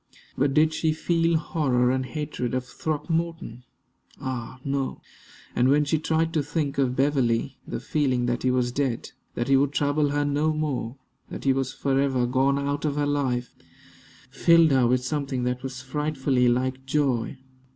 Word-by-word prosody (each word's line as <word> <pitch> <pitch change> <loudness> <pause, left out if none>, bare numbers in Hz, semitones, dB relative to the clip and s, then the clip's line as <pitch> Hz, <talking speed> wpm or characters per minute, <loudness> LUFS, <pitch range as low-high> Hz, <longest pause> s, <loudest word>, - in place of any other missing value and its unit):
But 135 0 +1
did 155 +1 +4
she 155 0 +1
feel 165 +1 +1
horror 130 -6 +1
and 130 0 0
hatred 130 -3 -4
of 130 -1 -2
Throckmorton? 155 -2 -3 0.5
Ah! 130 -1 -5
no. 135 -1 -2 0.6
And 125 +2 +3
when 150 +2 +4
she 155 +2 +1
tried 160 +1 0
to 155 - +2
think 145 -1 -2
of 130 -2 +1
Beverley, 135 -2 +1
the - - -4
feeling 130 -5 0
that 120 0 -1
he 130 - +1
was 125 -1 +1
dead; 130 -3 -2 0.2
that 120 - -2
he 135 - +4
would 140 +1 +2
trouble 145 0 +1
her 145 0 0
no 145 +2 +1
more; 140 -5 -3 0.3
that - - -7
he 135 - +3
was 135 0 -1
forever 135 -2 +1
gone 135 +3 +2
out 140 +1 -2
of 150 -2 0
her 145 0 +1
life, 130 -4 -1 0.8
filled 165 +3 +5
her 130 -3 +4
with 125 +1 +1
something 140 -3 -2
that 125 0 -1
was 125 -1 -6
frightfully 135 -2 0
like 130 +2 0
joy. 135 -3 0
135 Hz, 170 wpm, -25 LUFS, 125-150 Hz, 0.8 s, filled